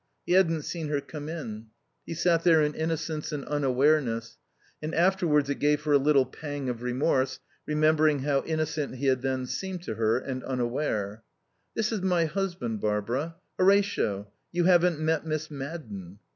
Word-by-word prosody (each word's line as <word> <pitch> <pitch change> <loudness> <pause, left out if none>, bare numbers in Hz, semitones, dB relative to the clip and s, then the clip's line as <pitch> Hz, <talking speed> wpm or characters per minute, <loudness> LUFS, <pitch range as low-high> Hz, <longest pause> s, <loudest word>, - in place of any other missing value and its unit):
He - - -3
hadn't 165 -4 +4
seen 165 -1 -4
her 145 -1 0
come 150 +1 -7
in. 115 -9 -6 0.4
He 165 - -4
sat 165 0 +2
there 165 -2 +6
in 150 0 0
innocence 160 -1 -2
and 145 -3 -4
unawareness; 135 -4 +1 0.4
and 155 +1 -3
afterwards 170 -5 +3
it 140 - -3
gave 150 0 +2
her 150 - -1
a 145 - +6
little 140 -1 +4
pang 145 -1 -5
of 120 -1 -4
remorse 130 +1 0 0.3
remembering 155 -1 +3
how 140 0 +1
innocent 155 -3 -2
he 135 +2 -4
had 130 -2 +3
then 130 -1 -1
seemed 185 +6 -4
to - - -4
her 110 0 +2
and 130 0 -4
unaware. 120 -5 -2 0.5
"This 220 -1 0
is 215 -4 -1
my 180 -3 +2
husband, 160 - -2
Barbara. 115 +10 -1 0.2
Horatio, 190 - +2 0.2
you 175 0 +1
haven't 175 -2 +4
met 160 -1 +1
Miss 155 -1 -3
Madden." 125 - -7
150 Hz, 165 wpm, -28 LUFS, 130-165 Hz, 0.5 s, there